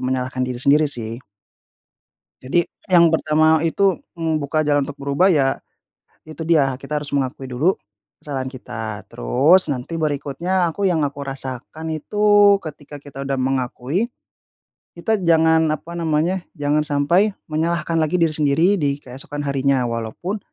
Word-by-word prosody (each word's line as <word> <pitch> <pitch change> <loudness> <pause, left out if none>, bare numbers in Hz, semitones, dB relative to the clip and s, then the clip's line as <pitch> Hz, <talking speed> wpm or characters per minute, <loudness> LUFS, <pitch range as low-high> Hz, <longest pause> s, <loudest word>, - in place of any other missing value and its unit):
menyalahkan 130 0 -2
diri 125 -1 -5
sendiri 150 +3 +4
sih. 115 -3 -4 1.2
Jadi 165 +7 +1 0.2
yang 170 -2 +5
pertama 155 0 +3
itu 190 +2 +2 0.2
membuka 155 -3 -1
jalan 145 -2 +1
untuk 145 0 -8
berubah 140 +7 +2
ya 135 -3 +2 0.7
itu 155 +1 -8
dia 150 -5 +3
kita 150 +2 -3
harus 145 - -8
mengakui 135 -1 -2
dulu 155 +10 +2 0.5
kesalahan 135 -3 -4
kita, 110 -5 -6
terus 145 - +3
nanti 145 +4 -3
berikutnya 160 +4 -1
aku 200 +4 0
yang 165 -4 +1
aku 140 0 -3
rasakan 135 +4 -4
itu, 205 +5 +4
ketika 150 -2 -9
kita 140 -1 -11
udah 135 - 0
mengakui 130 - -1 0.9
kita 215 +6 0
jangan 160 -2 +3
apa 170 +3 -8
namanya, 165 +3 +1 0.2
jangan 150 -1 0
sampai 170 +9 +2 0.2
menyalahkan 165 +1 0
lagi 155 +1 0
diri 165 -3 +3
sendiri 155 +6 +2
di 145 -2 -1
keesokan 135 +3 -6
harinya, 140 -2 +1
walaupun 115 - -4
150 Hz, 135 wpm, -21 LUFS, 135-170 Hz, 1.2 s, yang